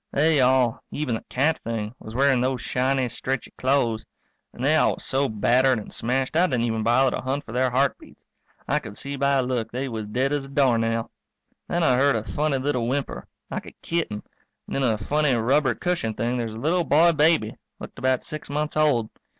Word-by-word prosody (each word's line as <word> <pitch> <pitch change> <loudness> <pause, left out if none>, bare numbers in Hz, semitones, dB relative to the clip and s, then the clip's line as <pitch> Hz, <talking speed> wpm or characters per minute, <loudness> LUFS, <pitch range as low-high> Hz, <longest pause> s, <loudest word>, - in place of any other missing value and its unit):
They 150 0 +3
all 125 -2 +2
even 145 -5 -2
the 110 - -3
cat 150 +5 +1
thing 110 -1 -3
was 110 +1 -10
wearing 135 -1 +3
those 130 0 0
shiny, 130 0 0
stretchy 130 +2 -4
clo'es. 125 -4 +1 0.5
And 125 - -5
they 155 +3 +4
all 155 - +3
was - - -11
so 135 +1 0
battered 125 +4 +3
and 105 - -8
smashed 130 +4 -1
I 175 +3 +4
didn't 125 -6 0
even 115 -1 -1
bother 125 +4 +3
to - - -4
hunt 135 +3 -3
for - - -10
their 130 +2 +1
heartbeats. 135 +3 -2 0.4
I 150 +3 +2
could 110 -7 -10
see 140 0 -5
by 140 0 +1
a 135 -2 +3
look 125 -3 -2
they 130 +3 -3
was 110 -4 -5
dead 130 +6 0
as 145 -2 -1
a - - -10
doornail. 115 -5 +1 0.6
Then 175 0 0
I 125 -6 +4
heard 140 0 +3
a 110 - -1
funny 150 +3 -1
little 130 -3 -1
whimper, 135 +2 -3 0.2
like - - -5
a - - -11
kitten, 160 -12 -2 0.4
and - - -6
in - - 0
a 115 -5 +2
funny, 145 +5 +1
rubber 130 +2 +2
cushioned 165 -11 -2
thing 120 +2 -1
there's 115 -3 -3
a - - -7
little 165 +8 +1
boy 165 +2 +5
baby, 150 -8 +2 0.2
looked - - -9
about 130 -1 +1
six 155 -1 -7
months 150 +1 -2
old. 140 -8 +2
130 Hz, 210 wpm, -24 LUFS, 115-145 Hz, 0.6 s, boy